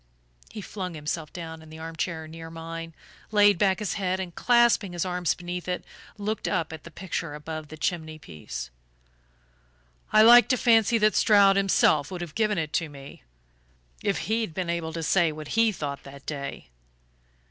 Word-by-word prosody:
He 210 Hz, -, -7 dB
flung 185 Hz, -3 st, -6 dB
himself 155 Hz, 0 st, -4 dB
down 160 Hz, -2 st, -8 dB
in 160 Hz, -, -14 dB
the 160 Hz, -, -10 dB
arm 160 Hz, 0 st, -7 dB
chair 160 Hz, -1 st, -3 dB
near 165 Hz, +1 st, -9 dB
mine, 165 Hz, 0 st, -7 dB, 0.3 s
laid 205 Hz, -3 st, +5 dB
back 190 Hz, -2 st, +3 dB
his 210 Hz, -3 st, -2 dB
head, 185 Hz, 0 st, 0 dB
and 180 Hz, -2 st, -5 dB
clasping 235 Hz, -5 st, +3 dB
his 175 Hz, +1 st, -2 dB
arms 180 Hz, -2 st, 0 dB
beneath 175 Hz, 0 st, -6 dB
it, 180 Hz, 0 st, -3 dB, 0.3 s
looked 210 Hz, +1 st, -3 dB
up 165 Hz, -4 st, -1 dB
at 160 Hz, -, -9 dB
the -, -, -8 dB
picture 170 Hz, -3 st, -5 dB
above 155 Hz, +1 st, -6 dB
the 155 Hz, -, -10 dB
chimney 160 Hz, -2 st, -2 dB
piece. 75 Hz, -, -8 dB, 1.4 s
"I 215 Hz, -, +7 dB
like 240 Hz, +2 st, +9 dB
to 255 Hz, -, +2 dB
fancy 230 Hz, -1 st, +4 dB
that 215 Hz, -1 st, +3 dB
Stroud 200 Hz, -2 st, +5 dB
himself 185 Hz, -7 st, +3 dB
would 180 Hz, -2 st, -6 dB
have 170 Hz, -3 st, -6 dB
given 215 Hz, -1 st, +1 dB
it 155 Hz, -2 st, -2 dB
to 165 Hz, -2 st, 0 dB
me, 140 Hz, -1 st, -12 dB, 0.8 s
if 200 Hz, -, 0 dB
he'd 220 Hz, -6 st, -1 dB
been 180 Hz, -2 st, -1 dB
able 170 Hz, -1 st, -3 dB
to 165 Hz, 0 st, -4 dB
say 170 Hz, 0 st, +3 dB
what 155 Hz, -1 st, -8 dB
he 225 Hz, 0 st, +3 dB
thought 145 Hz, -7 st, -5 dB
that 140 Hz, 0 st, -13 dB
day." 140 Hz, -, -6 dB
170 Hz, 180 wpm, -26 LUFS, 155-200 Hz, 1.4 s, like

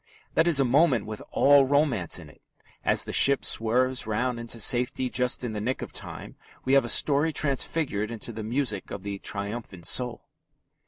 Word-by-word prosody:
That 165 Hz, -, +2 dB
is 160 Hz, -5 st, +5 dB
a 135 Hz, -, +3 dB
moment 130 Hz, -3 st, +2 dB
with 110 Hz, 0 st, -7 dB
all 140 Hz, -1 st, +4 dB
romance 140 Hz, -, 0 dB
in -, -, -10 dB
it. -, -, -19 dB, 0.4 s
As -, -, +2 dB
the -, -, -7 dB
ship 140 Hz, 0 st, +5 dB
swerves 125 Hz, +2 st, +1 dB
round 120 Hz, +3 st, -2 dB
into 115 Hz, 0 st, -4 dB
safety 125 Hz, +2 st, +2 dB
just 125 Hz, 0 st, -1 dB
in 120 Hz, -, -3 dB
the 105 Hz, -1 st, -5 dB
nick 125 Hz, +5 st, -3 dB
of -, -, -10 dB
time, -, -, -9 dB, 0.3 s
we 130 Hz, -, +1 dB
have 140 Hz, -, +5 dB
a -, -, -4 dB
story 145 Hz, +5 st, +3 dB
transfigured 140 Hz, -6 st, -1 dB
into 115 Hz, 0 st, -6 dB
the 110 Hz, -, -7 dB
music 115 Hz, -2 st, -3 dB
of 100 Hz, -, -8 dB
the 100 Hz, -1 st, -6 dB
triumphant 100 Hz, -3 st, -6 dB
soul. 125 Hz, -2 st, 0 dB
125 Hz, 190 wpm, -26 LUFS, 110-140 Hz, 0.4 s, is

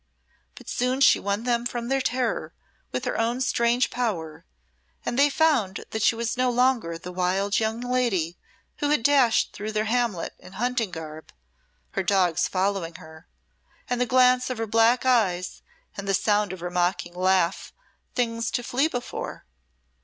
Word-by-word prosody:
But -, -, -13 dB
soon 250 Hz, +2 st, -1 dB
she 275 Hz, -, +6 dB
won 200 Hz, +2 st, -2 dB
them 240 Hz, -1 st, 0 dB
from 240 Hz, -1 st, -3 dB
their 270 Hz, +1 st, +1 dB
terror 260 Hz, -, -2 dB, 0.4 s
with 255 Hz, -, -3 dB
her 250 Hz, -, -2 dB
own 235 Hz, +2 st, 0 dB
strange 240 Hz, -1 st, +1 dB
power, 170 Hz, -9 st, -3 dB, 0.6 s
and -, -, -1 dB
they 285 Hz, +3 st, +5 dB
found 275 Hz, -11 st, +1 dB
that 220 Hz, -, -3 dB
she 230 Hz, -, +4 dB
was 235 Hz, +1 st, -2 dB
no 255 Hz, 0 st, +1 dB
longer 245 Hz, -8 st, +1 dB
the 180 Hz, +2 st, -8 dB
wild 185 Hz, +3 st, 0 dB
young 220 Hz, +1 st, -1 dB
lady 240 Hz, -10 st, 0 dB, 0.4 s
who 290 Hz, -, -1 dB
had 295 Hz, -6 st, +2 dB
dashed 265 Hz, -5 st, +3 dB
through 215 Hz, +1 st, -5 dB
their 215 Hz, 0 st, 0 dB
hamlet 225 Hz, -6 st, -1 dB
in 185 Hz, -, -14 dB
hunting 240 Hz, +1 st, -1 dB
garb, 160 Hz, -2 st, -9 dB, 0.6 s
her 195 Hz, -, -1 dB
dogs 180 Hz, -3 st, +2 dB
following 185 Hz, -3 st, -1 dB
her, 160 Hz, -1 st, -13 dB, 0.6 s
and 245 Hz, 0 st, -1 dB
the 250 Hz, -, +1 dB
glance 255 Hz, 0 st, +4 dB
of 255 Hz, -, -3 dB
her 225 Hz, -, -2 dB
black 225 Hz, +3 st, +3 dB
eyes 190 Hz, -8 st, +1 dB, 0.3 s
and 200 Hz, 0 st, -6 dB
the 195 Hz, -, +2 dB
sound 210 Hz, 0 st, +1 dB
of 185 Hz, -2 st, -8 dB
her 175 Hz, 0 st, -4 dB
mocking 175 Hz, 0 st, 0 dB
laugh 185 Hz, -1 st, +1 dB, 0.4 s
things 230 Hz, -2 st, -1 dB
to 245 Hz, -, -2 dB
flee 265 Hz, +6 st, +1 dB
before. 245 Hz, -6 st, -6 dB
225 Hz, 170 wpm, -25 LUFS, 185-250 Hz, 0.6 s, she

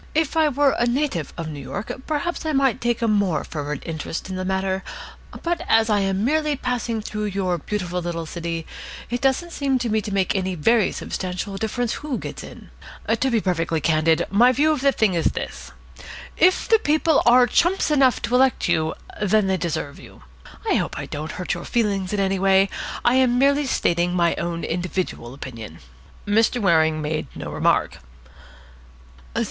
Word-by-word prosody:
If 320 Hz, 0 st, +1 dB
I 315 Hz, -1 st, +4 dB
were 285 Hz, 0 st, +3 dB
a 240 Hz, -, +2 dB
native 245 Hz, -, -1 dB
of 165 Hz, -2 st, -4 dB
New 150 Hz, -2 st, -6 dB
York, 200 Hz, +8 st, -5 dB, 0.2 s
perhaps 320 Hz, +3 st, -2 dB
I 315 Hz, -1 st, -1 dB
might 270 Hz, -4 st, +2 dB
take 240 Hz, 0 st, 0 dB
a -, -, +2 dB
more 200 Hz, -7 st, +1 dB
fervid 150 Hz, -2 st, -5 dB
interest 165 Hz, +3 st, -5 dB
in -, -, -3 dB
the 185 Hz, -, -3 dB
matter, 190 Hz, 0 st, -1 dB, 0.6 s
but 345 Hz, 0 st, -1 dB
as 225 Hz, 0 st, +4 dB
I 205 Hz, -, +3 dB
am 195 Hz, +1 st, 0 dB
merely 305 Hz, +2 st, +1 dB
passing 240 Hz, -4 st, -2 dB
through 210 Hz, 0 st, -4 dB
your 190 Hz, -3 st, -1 dB
beautiful 180 Hz, 0 st, -3 dB
little 170 Hz, -1 st, -4 dB
city, 165 Hz, 0 st, -4 dB, 0.5 s
it 245 Hz, -, -2 dB
doesn't 275 Hz, +6 st, +1 dB
seem 275 Hz, -4 st, 0 dB
to 245 Hz, -2 st, -2 dB
me 220 Hz, 0 st, +1 dB
to 210 Hz, -, -6 dB
make 195 Hz, -1 st, +1 dB
any 190 Hz, -1 st, -1 dB
very 215 Hz, +7 st, +3 dB
substantial 185 Hz, +2 st, -4 dB
difference 225 Hz, +3 st, -2 dB
who 295 Hz, -4 st, -3 dB
gets -, -, -7 dB
in. -, -, -12 dB, 0.4 s
To 230 Hz, +4 st, +2 dB
be 235 Hz, -, +2 dB
absolutely 170 Hz, -5 st, 0 dB
candid, 160 Hz, +1 st, +2 dB
my 240 Hz, +6 st, +5 dB
view 295 Hz, +5 st, +3 dB
of 300 Hz, -4 st, -1 dB
the 275 Hz, 0 st, +4 dB
thing 220 Hz, -7 st, +1 dB
is 170 Hz, -2 st, +1 dB
this. -, -, -6 dB, 0.6 s
If 370 Hz, +1 st, +3 dB
the 450 Hz, -2 st, +5 dB
People 310 Hz, -2 st, +2 dB
are 245 Hz, +1 st, +7 dB
chumps 345 Hz, -, +2 dB
enough 270 Hz, -4 st, +3 dB
to 240 Hz, -, -2 dB
elect 260 Hz, +1 st, +3 dB
you, 160 Hz, -2 st, +1 dB, 0.3 s
then 210 Hz, 0 st, +3 dB
they 190 Hz, 0 st, +1 dB
deserve 160 Hz, -5 st, -3 dB
you. 95 Hz, -9 st, -15 dB, 0.4 s
I -, -, +3 dB
hope -, -, -2 dB
I -, -, -4 dB
don't 155 Hz, +2 st, -6 dB
hurt 180 Hz, -, -3 dB
your 175 Hz, -1 st, -6 dB
feelings 200 Hz, -5 st, 0 dB
in 210 Hz, -, -1 dB
any 195 Hz, -1 st, +1 dB
way. 195 Hz, 0 st, +4 dB, 0.4 s
I 245 Hz, +2 st, +4 dB
am 250 Hz, -2 st, +3 dB
merely 280 Hz, +2 st, +3 dB
stating 175 Hz, -6 st, +1 dB
my 170 Hz, -1 st, +3 dB
own 170 Hz, 0 st, -3 dB
individual 175 Hz, -7 st, -3 dB
opinion." 115 Hz, -, -8 dB, 0.5 s
Mr. 225 Hz, +4 st, +2 dB
Waring 160 Hz, -6 st, +3 dB
made 155 Hz, +1 st, -2 dB
no -, -, -6 dB
remark. -, -, +1 dB
200 Hz, 185 wpm, -22 LUFS, 170-255 Hz, 0.6 s, are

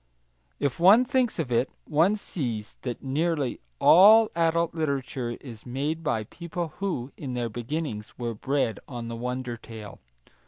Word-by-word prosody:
If 140 Hz, 0 st, -1 dB
one 205 Hz, +8 st, +7 dB
thinks 255 Hz, -3 st, +1 dB
of 150 Hz, -7 st, -2 dB
it, 120 Hz, +3 st, +2 dB, 0.2 s
one 165 Hz, +7 st, +3 dB
sees 120 Hz, -, -4 dB
that 125 Hz, -3 st, -5 dB
nearly 145 Hz, 0 st, 0 dB, 0.2 s
all 215 Hz, -, +7 dB
adult 170 Hz, 0 st, +2 dB
literature 135 Hz, -6 st, -2 dB
is 115 Hz, -6 st, -10 dB
made 145 Hz, +6 st, -2 dB
by 150 Hz, -9 st, 0 dB
people 170 Hz, -, -5 dB
who, 165 Hz, -10 st, -2 dB
in 130 Hz, -4 st, -5 dB
their 120 Hz, -1 st, -1 dB
beginnings, 120 Hz, -1 st, -4 dB
were 120 Hz, -2 st, -3 dB
bred 125 Hz, -1 st, -1 dB
on 120 Hz, -3 st, -6 dB
the 115 Hz, -, -4 dB
wonder 125 Hz, 0 st, -4 dB
tale. 110 Hz, -3 st, -10 dB
140 Hz, 150 wpm, -27 LUFS, 120-170 Hz, 0.2 s, one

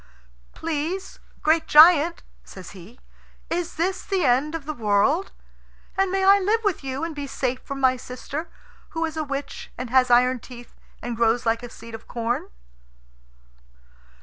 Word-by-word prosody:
"Please, 330 Hz, +4 st, -4 dB, 0.2 s
great 320 Hz, +1 st, +2 dB
giant," 325 Hz, +1 st, +6 dB, 0.2 s
says 185 Hz, -2 st, -11 dB
he, 200 Hz, +6 st, -14 dB, 0.5 s
"is 345 Hz, 0 st, -2 dB
this 365 Hz, +4 st, -1 dB
the 385 Hz, -3 st, -1 dB
end 270 Hz, +5 st, +2 dB
of 315 Hz, -4 st, -6 dB
the 305 Hz, -, -3 dB
world? 235 Hz, -, +1 dB, 0.6 s
And 385 Hz, 0 st, +2 dB
may 385 Hz, 0 st, 0 dB
I 395 Hz, +1 st, +7 dB
live 425 Hz, +4 st, +1 dB
with 405 Hz, -8 st, -1 dB
you 270 Hz, +1 st, -4 dB
and 330 Hz, -1 st, -3 dB
be 285 Hz, -1 st, -5 dB
safe 255 Hz, -1 st, -2 dB
from 275 Hz, 0 st, -6 dB
my 260 Hz, -1 st, +3 dB
sister, 275 Hz, +6 st, -7 dB, 0.5 s
who 330 Hz, -, +1 dB
is 320 Hz, -1 st, -5 dB
a 315 Hz, -, -1 dB
witch, 280 Hz, -1 st, -6 dB
and 250 Hz, -1 st, -6 dB
has 255 Hz, -1 st, +4 dB
iron 250 Hz, +1 st, +4 dB
teeth, 240 Hz, 0 st, -12 dB, 0.3 s
and 240 Hz, -1 st, -3 dB
grows 235 Hz, +2 st, +1 dB
like 230 Hz, 0 st, +1 dB
a 245 Hz, -, -8 dB
seed 230 Hz, 0 st, -12 dB
of 225 Hz, -, -9 dB
corn?" 235 Hz, 0 st, -2 dB
280 Hz, 165 wpm, -24 LUFS, 245-330 Hz, 0.6 s, I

